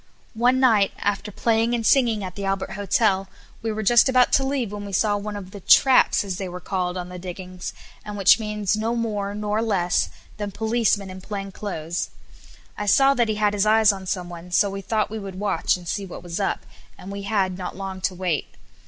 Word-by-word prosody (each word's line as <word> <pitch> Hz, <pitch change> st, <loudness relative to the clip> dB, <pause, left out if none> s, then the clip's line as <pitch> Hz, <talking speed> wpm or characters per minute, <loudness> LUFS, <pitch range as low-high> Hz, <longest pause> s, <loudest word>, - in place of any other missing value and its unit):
One 245 Hz, +3 st, +3 dB
night 220 Hz, -7 st, +4 dB
after 205 Hz, +1 st, -2 dB
playing 230 Hz, +3 st, +1 dB
and 230 Hz, -2 st, -2 dB
singing 230 Hz, -6 st, +3 dB
at 185 Hz, -2 st, -5 dB
the 200 Hz, -, -6 dB
Albert 195 Hz, 0 st, -2 dB
Hotel, 195 Hz, -1 st, +1 dB, 0.3 s
we 225 Hz, -, -2 dB
were 215 Hz, 0 st, -3 dB
just 240 Hz, +5 st, +5 dB
about 255 Hz, -1 st, +4 dB
to 270 Hz, -, +4 dB
leave 265 Hz, -6 st, -1 dB
when 205 Hz, 0 st, -6 dB
we 200 Hz, -1 st, -7 dB
saw 205 Hz, +2 st, +2 dB
one 205 Hz, +1 st, -4 dB
of 190 Hz, -2 st, -8 dB
the 200 Hz, -, -9 dB
"traps" 260 Hz, +6 st, +5 dB
as 190 Hz, -3 st, -4 dB
they 190 Hz, -2 st, -4 dB
were 180 Hz, +1 st, -7 dB
called 180 Hz, -1 st, -2 dB
on 180 Hz, 0 st, -5 dB
the 180 Hz, 0 st, -8 dB
diggings, 180 Hz, 0 st, -7 dB, 0.3 s
and 210 Hz, -1 st, -6 dB
which 195 Hz, +3 st, +6 dB
means 210 Hz, -2 st, -1 dB
no 225 Hz, +2 st, -1 dB
more 205 Hz, -3 st, -2 dB
nor 210 Hz, +1 st, -1 dB
less 190 Hz, -5 st, +1 dB, 0.3 s
than 205 Hz, -1 st, -3 dB
"policeman 220 Hz, -2 st, 0 dB
in 185 Hz, 0 st, -9 dB
plain 195 Hz, 0 st, -5 dB
clothes." 175 Hz, -4 st, -4 dB, 0.7 s
I 210 Hz, -, -3 dB
saw 270 Hz, +7 st, +5 dB
that 235 Hz, -4 st, +1 dB
he 215 Hz, -, 0 dB
had 210 Hz, -1 st, +1 dB
his 205 Hz, 0 st, +1 dB
eyes 220 Hz, 0 st, +6 dB
on 190 Hz, -1 st, -7 dB
someone, 175 Hz, -1 st, -5 dB
so 200 Hz, +3 st, +2 dB
we 195 Hz, 0 st, -5 dB
thought 215 Hz, +1 st, -1 dB
we 220 Hz, -, -4 dB
would 195 Hz, -2 st, -7 dB
watch 205 Hz, -2 st, +1 dB
and 175 Hz, -1 st, -12 dB
see 200 Hz, +2 st, -3 dB
what 180 Hz, -, -9 dB
was 175 Hz, +2 st, -5 dB
up, 195 Hz, -, -1 dB, 0.3 s
and 190 Hz, -, -9 dB
we 200 Hz, 0 st, -5 dB
had 195 Hz, -2 st, 0 dB
not 180 Hz, -1 st, -6 dB
long 190 Hz, -1 st, -6 dB
to 185 Hz, 0 st, -1 dB
wait. 180 Hz, -4 st, -1 dB
205 Hz, 220 wpm, -23 LUFS, 190-220 Hz, 0.7 s, which